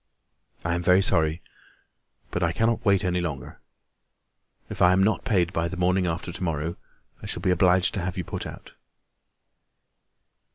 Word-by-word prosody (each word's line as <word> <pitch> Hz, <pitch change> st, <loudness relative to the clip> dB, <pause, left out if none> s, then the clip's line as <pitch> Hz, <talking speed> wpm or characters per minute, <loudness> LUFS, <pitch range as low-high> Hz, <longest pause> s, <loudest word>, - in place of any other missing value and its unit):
"I 85 Hz, -, 0 dB
am 85 Hz, -, -1 dB
very 90 Hz, +2 st, +4 dB
sorry, 80 Hz, 0 st, +2 dB, 0.9 s
but 90 Hz, -, -2 dB
I 85 Hz, -1 st, +1 dB
cannot 115 Hz, +4 st, 0 dB
wait 100 Hz, -2 st, +3 dB
any 90 Hz, 0 st, 0 dB
longer. 70 Hz, -7 st, -6 dB, 1.1 s
If -, -, -7 dB
I 90 Hz, 0 st, +6 dB
am 95 Hz, +1 st, +3 dB
not 110 Hz, +2 st, +1 dB
paid 95 Hz, -9 st, +1 dB
by 85 Hz, 0 st, 0 dB
the 95 Hz, -, -6 dB
morning 90 Hz, +1 st, +1 dB
after 85 Hz, +1 st, -3 dB
to 90 Hz, +2 st, -6 dB
morrow, 80 Hz, 0 st, -2 dB, 0.5 s
I -, -, -7 dB
shall -, -, -4 dB
be 90 Hz, -, +2 dB
obliged 90 Hz, +1 st, +3 dB
to 100 Hz, -, -2 dB
have 90 Hz, +1 st, -4 dB
you 90 Hz, -, -2 dB
put -, -, -5 dB
out." -, -, -11 dB
90 Hz, 170 wpm, -25 LUFS, 85-95 Hz, 1.1 s, I